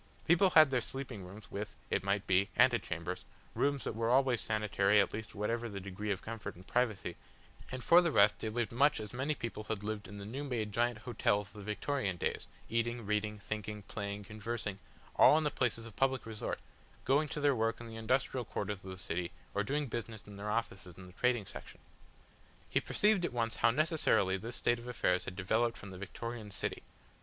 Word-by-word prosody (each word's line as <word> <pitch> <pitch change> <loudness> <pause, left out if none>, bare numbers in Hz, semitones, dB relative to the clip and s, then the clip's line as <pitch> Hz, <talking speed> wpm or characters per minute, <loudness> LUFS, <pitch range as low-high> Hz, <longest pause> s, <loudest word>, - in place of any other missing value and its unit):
People 175 +3 +6
had 155 -5 +7
their 125 -2 +2
sleeping 130 -6 -6
rooms, 100 +4 -11
with, 105 +1 -5 0.2
it 95 - +1
might 100 0 0
be, 95 +1 +3
antechambers, 105 -8 +2 0.3
rooms 140 -2 +1
that - - -2
were 115 +1 0
always 130 -1 +4
sanitary 105 -1 +3
at 100 - +2
least 110 0 -6
whatever 115 +3 -1
the 100 -2 -5
degree 100 +2 -5
of 100 -1 -1
comfort 115 -1 -5
and 90 +2 -14
privacy, 110 -8 0 0.6
and 130 -1 -4
for 175 +1 +8
the 170 -2 +1
rest 100 -5 +5
they 110 - -2
lived 120 +1 -1
much 140 +5 +4
as 105 0 -7
many 135 +5 0
people 110 -4 -5
had 105 -1 -3
lived 105 -1 -3
in 105 - -9
the 100 - -7
new 130 +7 -4
made 115 -6 -2
giant 120 +2 +1
hotels 105 -4 0
of - - -20
the 105 - -9
Victorian 105 -1 -1
days, - - -1 0.2
eating, 115 0 -1
reading, 105 +1 0
thinking, 105 0 -5
playing, 100 0 -5
conversing, 105 -1 -4 0.4
all 150 - +8
in 160 - +1
places 115 -2 -1
of 115 - -11
public 135 -1 +1
resort, 110 -1 -3 0.5
going 145 +4 +3
to 150 - -3
their 145 -1 +4
work 115 0 0
in 120 - -8
the 115 - -8
industrial 125 +3 0
quarters 105 -3 -4
of 95 - -8
the 95 - -6
city 90 -1 -2 0.2
or 100 - +1
doing 145 +7 0
business 115 -4 -5
in 105 - -11
their 100 +1 -5
offices 95 -5 -3
in 95 - -10
the 90 - -13
trading 125 -2 +1
section. - - -10 0.9
He - - +1
perceived 210 -3 +3
at 170 - -1
once 115 -1 0
how - - +5
necessarily 145 - +2
this 115 +5 -6
state 120 0 +1
of 120 - -10
affairs 90 -7 +1
had 95 - -5
developed 110 +5 +1
from 100 - -9
the 90 - -9
Victorian 115 +2 -6
city. 95 - -3
110 Hz, 205 wpm, -34 LUFS, 100-125 Hz, 0.9 s, for